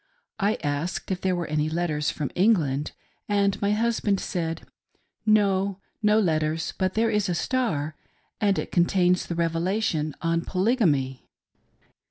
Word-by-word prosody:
I 210 +1 +2
asked 145 +7 -2
if 185 - -2
there 185 -1 +1
were 175 -1 -2
any 150 0 0
letters 155 -2 -1
from 145 -3 -3
England, 160 -8 +2 0.4
and 200 -1 +1
my 200 0 +2
hus 230 +2 +1
band 200 -2 +1
said: 165 -2 -3 0.4
" - - -43 0.2
No; 200 -2 +3 0.2
no 210 0 +4
letters, 160 -4 0
but 185 0 0
there 225 +1 +2
is 210 -3 +1
a 175 - 0
Star, 165 - -1 0.4
and 200 -2 +2
it - - -3
con 175 -1 +4
tains 180 -1 +2
the 170 - -3
Revelation 165 -2 0
on 165 0 0
Polygamy." 175 - 0
180 Hz, 155 wpm, -25 LUFS, 155-205 Hz, 0.4 s, no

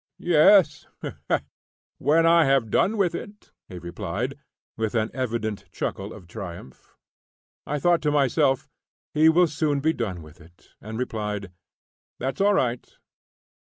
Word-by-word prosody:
"Yes, 165 0 +4 1.1
when 155 +5 +3
I 165 -1 +6
have 135 -5 +2
done 220 +3 +2
with 185 -4 +2
it," 205 +4 -9 0.2
he 90 - -8
replied, 100 +8 -4 0.4
with 110 0 -2
an 110 -1 0
evident 115 -5 -3
chuckle 100 +2 -4
of 100 -4 -11
triumph. 85 - -10 0.7
I 150 - -1
thought 175 +3 +2
to 150 - +1
myself, 140 -1 +2 0.5
he 155 +1 +5
will 175 +2 +5
soon 150 -2 0
be 160 +3 +1
done 95 - -4
with 75 +3 -16
it, 85 +3 -20
and 110 +1 -7
replied: 105 -5 -3 0.7
"That's 135 +8 -3
all 205 0 +4
right." 125 -8 -1
130 Hz, 135 wpm, -25 LUFS, 105-160 Hz, 1.1 s, I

